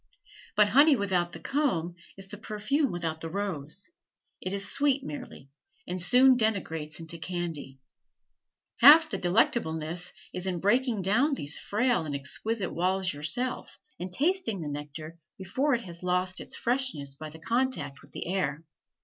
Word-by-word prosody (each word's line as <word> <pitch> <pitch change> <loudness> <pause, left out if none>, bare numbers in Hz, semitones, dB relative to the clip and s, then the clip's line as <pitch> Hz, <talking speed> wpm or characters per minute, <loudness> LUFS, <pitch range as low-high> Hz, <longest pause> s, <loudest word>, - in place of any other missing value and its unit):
But 210 -1 +5
honey 285 +6 +6
without 185 -5 0
the - - -9
comb 240 - 0 0.2
is 195 0 -8
the 210 - -8
perfume 235 +7 0
without 165 -2 -3
the 165 - -4
rose, 190 - -4 0.5
it 185 - -3
is 200 0 -1
sweet 280 -1 +2
merely, 255 - -8 0.4
and 180 0 -3
soon 255 +7 +6
degenerates 165 -9 -1
into 165 0 -8
candy. 165 -6 -5 1.0
Half 315 +1 +9
the - - -2
delectableness 175 -3 0 0.2
is 180 +1 -4
in 180 -2 -1
breaking 225 +2 +2
down 255 - +3
these 145 - -1
frail 240 0 +1
and 150 -3 -4
exquisite 195 +9 -3
walls 185 +2 0
yourself, 245 - -2 0.2
and 180 +1 -5
tasting 290 - +1
the 150 - -4
nectar 150 +3 -7 0.2
before 255 +9 0
it 240 - -3
has 170 -2 -9
lost 180 +1 0
its - - -7
freshness 240 - -1
by 155 +3 -8
the 155 - -12
contact 235 - -1
with - - -19
the - - -5
air. 165 -4 -1
185 Hz, 155 wpm, -28 LUFS, 165-245 Hz, 1.0 s, Half